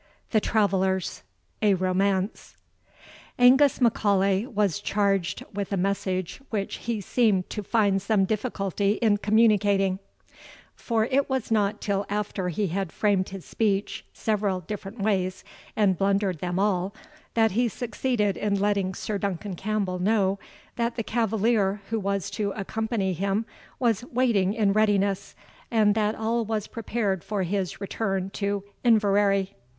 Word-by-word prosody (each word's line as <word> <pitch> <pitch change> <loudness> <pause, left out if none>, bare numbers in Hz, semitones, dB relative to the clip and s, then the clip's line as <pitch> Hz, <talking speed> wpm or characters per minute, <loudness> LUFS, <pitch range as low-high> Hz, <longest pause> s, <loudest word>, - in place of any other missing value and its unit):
THE 215 - +3
TRAVELLERS, 190 -4 0 0.4
A 205 -3 +4
ROMANCE. 190 +2 -1 0.8
Angus 260 +3 +5
M'Aulay 200 -3 +2
was 205 - 0
charged 200 -3 0
with 200 0 -4
a 200 - 0
message 185 +1 -2
which 200 -3 -3
he 230 -2 -3
seemed 200 -3 +1
to 210 - -3
find 200 -2 +2
some 200 -1 +2
difficulty 200 -2 -1
in 215 -2 +2
communicating; 205 -3 +3 0.7
for 225 -2 0
it 275 +4 +1
was 265 -4 -2
not 210 -2 +1
till 200 -1 -1
after 205 -2 -2
he 195 +3 -1
had 190 0 -2
framed 200 -3 +1
his 195 -2 -8
speech 205 -2 -1
several 205 -4 -1
different 200 +4 -7
ways, 190 -3 0 0.3
and 195 -5 +2
blundered 195 -3 +1
them 175 +1 -2
all, 195 0 0 0.4
that 225 -1 +4
he 240 +5 +2
succeeded 230 -2 -1
in 200 -1 0
letting 200 -2 0
Sir 210 -2 -3
Duncan 200 0 -3
Campbell 195 -1 -2
know, 195 0 +2 0.4
that 235 0 0
the 230 - -2
cavalier 220 -2 +1
who 225 - +1
was 200 -2 -2
to 205 -1 -1
accompany 215 -1 -2
him 195 +5 -1 0.3
was 235 -5 +1
waiting 230 -6 +1
in 205 -3 +2
readiness, 200 -2 +1 0.3
and 215 -3 +3
that 215 0 0
all 230 +1 0
was 215 -1 -2
prepared 215 -5 -2
for 205 -3 -2
his 190 0 -2
return 195 -1 -2
to 200 -1 -2 0.2
Inverary. 200 -4 +3
205 Hz, 140 wpm, -26 LUFS, 195-220 Hz, 0.8 s, Angus